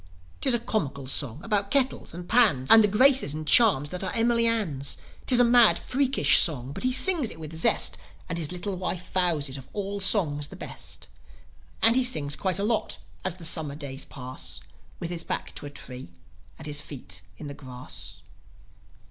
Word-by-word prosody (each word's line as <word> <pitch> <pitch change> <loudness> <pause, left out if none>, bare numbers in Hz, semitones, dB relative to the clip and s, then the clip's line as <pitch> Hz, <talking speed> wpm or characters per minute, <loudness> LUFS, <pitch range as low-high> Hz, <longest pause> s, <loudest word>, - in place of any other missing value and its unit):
'Tis 265 -3 +2
a - - -1
comical 145 - -3
song 130 -1 -2
about 205 -3 -1
kettles 270 -1 0
and 175 +1 -9
pans, 200 - +3
And 225 -1 +8
the - - +5
graces 255 - +4
and 155 0 -6
charms 170 - +5
that 180 +1 -3
are 185 - -3
Emily 230 0 +3
Ann's. 165 -12 0 0.3
'Tis 250 -2 +5
a - - +6
mad, 235 -1 +5
freakish 270 0 +3
song, 135 -7 +2
but - - -6
he 255 - +1
sings 280 - +3
it 160 - -8
with 160 0 -9
zest, 160 - +2 0.3
And 165 0 -3
his 155 -1 -3
little 185 +2 -5
wife 180 0 -5
vows 175 -6 +2
it 135 +1 -5
of 130 - -14
all 200 0 -4
songs 155 -8 +1
the - - -12
best. - - -8 0.8
And 225 +1 +5
he 260 - +4
sings 150 - +2
quite 185 -2 -2
a 200 - -2
lot, 220 +1 -1 0.3
as 185 -2 -3
the 175 -2 -9
Summer 155 -3 +1
days 140 -3 -5
pass, 125 - -6 0.4
With 170 - -5
his 170 -1 -4
back - - -5
to - - -8
a - - -8
tree 125 -5 -6 0.5
and 160 - -12
his 145 -1 -3
feet 120 - -8 0.2
in - - -10
the 140 - -7
grass. 125 - -8
175 Hz, 195 wpm, -25 LUFS, 145-225 Hz, 0.8 s, And